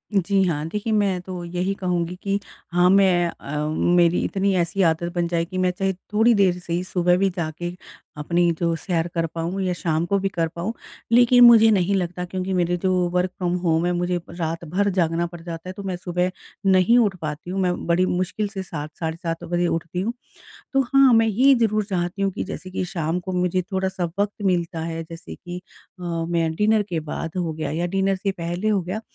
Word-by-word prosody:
जी 195 +1 +2
हाँ, 155 -5 -1
देखिए, 210 +5 -2
मैं 200 -3 +2
तो 180 -1 -7
यही 180 +3 -1
कहूँगी 180 -1 -1
कि 200 0 0 0.3
हाँ, 175 +1 +4
मैं 185 -3 +4
अ, 150 -1 -4 0.3
मेरी 175 0 +4
इतनी 195 0 0
ऐसी 175 +3 0
आदत 170 0 +1
बन 175 -1 +1
जाए 170 -1 0
कि 185 +2 -7
मैं 185 0 +2
चाहे 190 +1 -1 0.2
थोड़ी 225 +3 +5
देर 190 -4 +3
से 170 -1 -5
ही 175 +1 0
सुबह 180 -1 +2
भी 195 +1 +2
जाके 175 0 -4 0.4
अपनी 170 +3 +2
जो 170 -1 +1
सैर 165 -1 -1
कर 165 -1 0
पाऊँ 170 +4 -2
या 180 -1 0
शाम 165 -2 -1
को 200 +3 +1
भी 195 0 -1
कर 170 -4 -1
पाऊँ, 170 +7 -4 0.4
लेकिन 245 +1 +6
मुझे 230 -2 +8
नहीं 195 -1 +2
लगता 180 -1 -2
क्योंकि 185 +1 -3
मेरे 175 -1 +1
जो 185 +2 0 0.2
वर्क़ 180 +1 0
फ्रॉम 175 -2 -1
होम 170 -2 +1
है, 175 - +1
मुझे 175 0 0
रात 165 -1 -4
भर 195 +6 0
जागना 170 -2 +1
पड़ 170 0 -10
जाता 165 +1 -7
है, - - -5
तो 200 - -8
मैं 190 -2 -3
सुबह 180 0 -1 0.3
नहीं 190 +4 +5
उठ 205 -5 +2
पाती 155 +2 -5
हूँ, 195 - -2
मैं 180 -1 +1
बड़ी 170 +2 +3
मुश्किल 185 +3 -1
से 200 -2 -6
7 155 -4 -6
साढ़े 160 -1 -2
7 165 -1 -4
बजे 175 0 0
उठती 170 +2 -2
हूँ। 225 +5 -1 0.6
तो 270 - +3
हाँ, 270 0 +5
मैं 225 0 +5
ये 255 +6 +5
ज़रूर 215 -3 +1
चाहती 185 -1 -2
हूँ 195 - +2
कि - - -4
जैसे 185 -1 -7
कि 185 - -2
शाम 170 -2 -2
को 185 +1 -6
मुझे 180 0 +1
थोड़ा-सा 190 -1 -1
वक़्त 205 0 +1
मिलता 170 -3 0
है, 165 0 -4
जैसे 165 0 -9
कि 180 0 -8 0.4
अ, - - -8
मैं 165 -1 -1
डिनर 210 +4 +3
के 170 -4 -2
बाद 155 +1 -5
हो 170 -3 -1
गया 155 0 -4
या 170 +3 -1
डिनर 195 +1 +1
से 195 +1 -1
पहले 175 +3 -3
हो 205 -2 +2
गया, 185 +5 -4
180 Hz, 215 wpm, -23 LUFS, 170-195 Hz, 0.6 s, मुझे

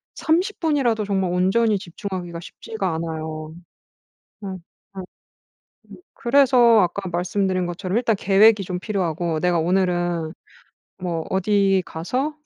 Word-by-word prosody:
30 355 +6 0
분이라도 270 -10 +1
정말 190 -3 0
온전히 195 +4 +2
집중하기가 175 -1 -6
쉽지가 190 +1 -5
않아요. 160 -1 -5 0.9
음. 190 -1 -5 0.4
음. 190 - -5 0.9
음. - - -9 0.2
그래서 245 -3 +5
아까 185 +2 -1
말씀드린 185 +1 -1
것처럼 185 +3 -3
일단 235 -2 +2
계획이 205 +2 +4
좀 180 -1 -4
필요하고 175 -5 -2
'내가 175 0 +1
오늘은 175 -2 0 0.7
뭐 170 -3 -3
어디 195 0 +2
가서' 255 - -3
190 Hz, 265 characters per minute, -22 LUFS, 175-215 Hz, 0.9 s, 그래서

